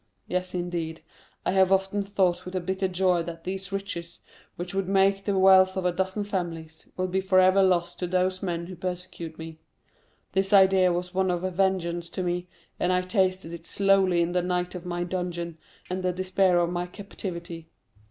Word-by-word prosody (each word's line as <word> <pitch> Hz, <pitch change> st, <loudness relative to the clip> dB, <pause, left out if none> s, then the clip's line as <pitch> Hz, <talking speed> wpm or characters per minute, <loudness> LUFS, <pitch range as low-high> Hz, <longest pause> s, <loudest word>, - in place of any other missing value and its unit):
Yes, 185 Hz, 0 st, -2 dB
indeed, 170 Hz, -2 st, -3 dB, 0.4 s
I -, -, +2 dB
have 190 Hz, 0 st, +4 dB
often 195 Hz, +1 st, +2 dB
thought 190 Hz, -3 st, +1 dB
with 180 Hz, +1 st, -8 dB
a -, -, +1 dB
bitter 190 Hz, +2 st, -1 dB
joy 180 Hz, -1 st, +2 dB
that 165 Hz, 0 st, -7 dB
these 190 Hz, +1 st, -4 dB
riches, 185 Hz, -4 st, -5 dB, 0.4 s
which 175 Hz, +1 st, -6 dB
would 195 Hz, -1 st, -1 dB
make 195 Hz, 0 st, +3 dB
the 200 Hz, -2 st, +1 dB
wealth 190 Hz, 0 st, +6 dB
of 185 Hz, -, -2 dB
a 180 Hz, -, +3 dB
dozen 190 Hz, +3 st, -1 dB
families, 165 Hz, -5 st, -5 dB
will 185 Hz, -, 0 dB
be 185 Hz, +1 st, 0 dB
forever 185 Hz, 0 st, +5 dB
lost 175 Hz, -2 st, +1 dB
to 180 Hz, -, -1 dB
those 185 Hz, +1 st, 0 dB
men 170 Hz, -3 st, -2 dB
who 185 Hz, +1 st, -8 dB
persecute 180 Hz, -2 st, -6 dB
me. 160 Hz, -1 st, -9 dB, 0.7 s
This 195 Hz, +2 st, 0 dB
idea 190 Hz, -2 st, +6 dB
was 180 Hz, +1 st, -3 dB
one 190 Hz, 0 st, +1 dB
of 175 Hz, 0 st, -1 dB
vengeance 175 Hz, -2 st, 0 dB
to 185 Hz, -, -4 dB
me, 175 Hz, 0 st, -2 dB, 0.3 s
and 180 Hz, -, +1 dB
I 180 Hz, 0 st, +3 dB
tasted 185 Hz, -3 st, 0 dB
it 170 Hz, 0 st, -9 dB
slowly 195 Hz, -3 st, +3 dB
in 170 Hz, -, -2 dB
the 180 Hz, 0 st, +1 dB
night 180 Hz, 0 st, -1 dB
of 180 Hz, -1 st, -7 dB
my 175 Hz, 0 st, -2 dB
dungeon 175 Hz, -2 st, -4 dB, 0.3 s
and 185 Hz, +1 st, -3 dB
the 185 Hz, 0 st, +1 dB
despair 185 Hz, 0 st, +2 dB
of 175 Hz, 0 st, +2 dB
my 175 Hz, 0 st, -2 dB
captivity. 170 Hz, -4 st, -7 dB
180 Hz, 190 wpm, -26 LUFS, 175-190 Hz, 0.7 s, wealth